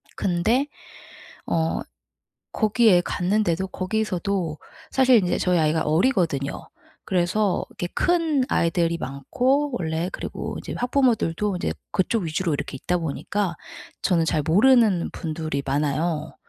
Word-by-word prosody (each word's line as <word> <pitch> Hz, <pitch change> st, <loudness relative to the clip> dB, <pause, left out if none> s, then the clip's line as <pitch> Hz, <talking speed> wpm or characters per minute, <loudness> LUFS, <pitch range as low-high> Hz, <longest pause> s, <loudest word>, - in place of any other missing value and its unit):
근데 220 Hz, +10 st, +1 dB, 0.8 s
어 160 Hz, -1 st, 0 dB, 0.7 s
거기에 215 Hz, -4 st, +4 dB
갔는데도 190 Hz, 0 st, 0 dB
거기서도 185 Hz, -4 st, -2 dB, 0.3 s
사실 260 Hz, -2 st, +5 dB
인제 180 Hz, -4 st, +1 dB
저희 180 Hz, -2 st, +2 dB
아이가 155 Hz, +1 st, +2 dB
어리거든요. 160 Hz, -, 0 dB, 0.4 s
그래서 185 Hz, +2 st, +1 dB
이렇게 175 Hz, -, -4 dB
큰 330 Hz, -6 st, +2 dB
아이들이 170 Hz, 0 st, +1 dB
많고 250 Hz, -, 0 dB
원래 160 Hz, +2 st, -2 dB
그리고 -, -, -5 dB
이제 -, -, -7 dB
학부모들도 220 Hz, -, +1 dB
이제 -, -, -2 dB, 0.2 s
그쪽 190 Hz, +2 st, 0 dB
위주로 165 Hz, +1 st, -1 dB
이렇게 140 Hz, -1 st, -4 dB
있다 180 Hz, 0 st, 0 dB
보니까 170 Hz, +4 st, -2 dB, 0.5 s
저는 170 Hz, -3 st, +2 dB
잘 155 Hz, -, +1 dB
모르는 210 Hz, -, +4 dB
분들이 155 Hz, -4 st, -3 dB
많아요. 150 Hz, +3 st, -1 dB
180 Hz, 290 characters per minute, -24 LUFS, 160-215 Hz, 0.8 s, 사실